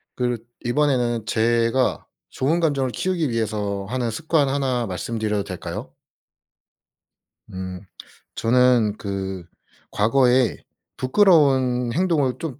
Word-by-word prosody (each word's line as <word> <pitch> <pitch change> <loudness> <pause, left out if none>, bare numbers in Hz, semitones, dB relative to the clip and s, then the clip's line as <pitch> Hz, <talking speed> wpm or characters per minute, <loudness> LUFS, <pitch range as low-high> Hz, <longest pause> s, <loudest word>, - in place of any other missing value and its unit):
그렇 125 -1 -1 0.3
이번에는 120 -4 +1
제가 115 +3 +1 0.2
좋은 155 +6 0
감정을 140 -6 0
키우기 175 0 -1
위해서 105 -3 -2
하는 125 -2 -1
습관 150 +3 +1
1 130 -3 0
말씀드려도 105 +1 -2
될까요? 90 -2 -7 1.6
음. 95 0 -6 0.5
저는 120 -3 +3
그 95 -2 -4 0.5
과거에 125 +2 +3 0.4
부끄러운 130 - +3
행동을 160 -7 +1
좀 150 -5 -6
125 Hz, 220 characters per minute, -22 LUFS, 110-135 Hz, 1.6 s, 저는